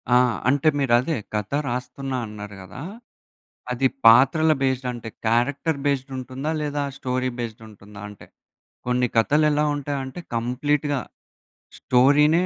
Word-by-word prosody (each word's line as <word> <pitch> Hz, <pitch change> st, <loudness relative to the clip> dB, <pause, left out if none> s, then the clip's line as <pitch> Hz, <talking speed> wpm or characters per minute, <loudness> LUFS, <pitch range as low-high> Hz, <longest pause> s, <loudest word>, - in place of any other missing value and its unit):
ఆ! -, -, +8 dB, 0.3 s
అంటే 145 Hz, +3 st, +2 dB
మీరదే 130 Hz, +4 st, +2 dB, 0.2 s
కథ 105 Hz, -1 st, -2 dB, 0.2 s
రాస్తున్నా 125 Hz, +2 st, -4 dB
అన్నారు 105 Hz, -1 st, -9 dB
గదా! 95 Hz, +7 st, -10 dB, 0.9 s
అది 130 Hz, +2 st, +2 dB, 0.2 s
పాత్రల 135 Hz, +7 st, +6 dB
బేస్డ్ 130 Hz, -1 st, 0 dB
అంటే 115 Hz, -2 st, -7 dB, 0.2 s
క్యారెక్టర్ 140 Hz, +7 st, +1 dB
బేస్డ్ 135 Hz, -1 st, 0 dB
ఉంటుందా 130 Hz, +4 st, -4 dB
లేదా 145 Hz, -1 st, -2 dB
స్టోరీ 130 Hz, 0 st, -1 dB
బేస్డ్ 115 Hz, -1 st, -5 dB
ఉంటుందా? 105 Hz, 0 st, -13 dB
అంటే 105 Hz, -, -13 dB, 0.6 s
కొన్ని 125 Hz, 0 st, +2 dB
కథలు 150 Hz, +7 st, +3 dB
ఎలా 150 Hz, 0 st, +2 dB
ఉంటాయంటే 140 Hz, +2 st, -4 dB, 0.2 s
కంప్లీట్‌గా 140 Hz, +4 st, 0 dB, 0.8 s
స్టోరీ‌నే. 150 Hz, +7 st, +4 dB
130 Hz, 120 wpm, -23 LUFS, 120-145 Hz, 0.9 s, ఆ